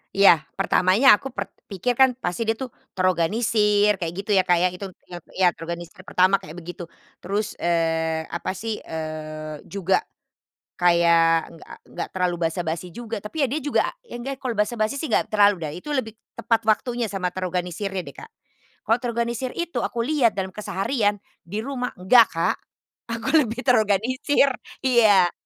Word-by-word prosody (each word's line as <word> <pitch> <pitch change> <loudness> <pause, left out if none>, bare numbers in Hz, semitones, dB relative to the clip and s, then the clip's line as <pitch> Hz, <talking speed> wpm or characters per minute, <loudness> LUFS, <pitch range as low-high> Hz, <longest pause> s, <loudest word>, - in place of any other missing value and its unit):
Iya 195 -5 +6 0.2
pertamanya 195 +5 +5
aku 270 - -5
pert 260 - -6 0.2
pikir 205 +5 -1
kan 255 0 +4
pasti 175 -5 -3
dia 225 0 0
tuh 255 -2 -6 0.2
terorganisir 210 +3 +2
kayak 165 -1 -2
gitu 200 +2 -4
ya 190 - +5
Kak 180 -1 +2
ya, 180 +2 +3
itu 180 +2 -7 0.2
ya 175 - -8 0.2
ya 185 -1 +5
terorganisir 170 +2 -7
pertama 185 +1 +2
kayak 155 +3 -11
begitu. 175 0 -8 0.3
Terus, 205 +3 -2
eee, 165 -1 0
apa 170 +3 -4
sih, 220 +2 -4
eee, 155 -1 -6
juga 195 -1 +1 0.8
kayak 170 -2 +4
nggak 165 - -12 0.2
nggak - - -4
terlalu 180 -1 +1
basa-basi 165 +1 -4
juga 225 +4 -6
tapi 275 +9 -2
ya - - +2
dia 305 - -1
juga 290 +1 +1 0.2
ya 480 - -10
nggak 270 +3 -6
kalau 245 -4 -3
basa-basi 215 +3 0
sih 300 +2 -4
nggak - - +2
terlalu 205 -1 +4
dah, 155 -2 -4
itu 295 +12 -6
lebih 225 -6 -2 0.2
tepat 230 -1 0
waktunya 240 +2 +1
sama 195 -4 -2
terorganisirnya 185 +1 -3
deh 175 - -10
Kak. 450 - -11 0.6
Kalau 225 - +5
terorganisir 235 +1 -2
itu 345 -4 -5
aku 235 - -3
lihat 245 -2 +2
dalam 190 -2 -3
keseharian 205 +1 -1 0.2
di 205 +6 -4
rumah, 250 0 -4
nggak 230 +5 +7
Kak. 165 0 0 0.5
Aku 230 -1 -4
lebih 245 -2 -2
terorganisir. 250 +4 +2 0.3
Iya, 215 -8 +5
205 Hz, 165 wpm, -23 LUFS, 175-235 Hz, 0.8 s, nggak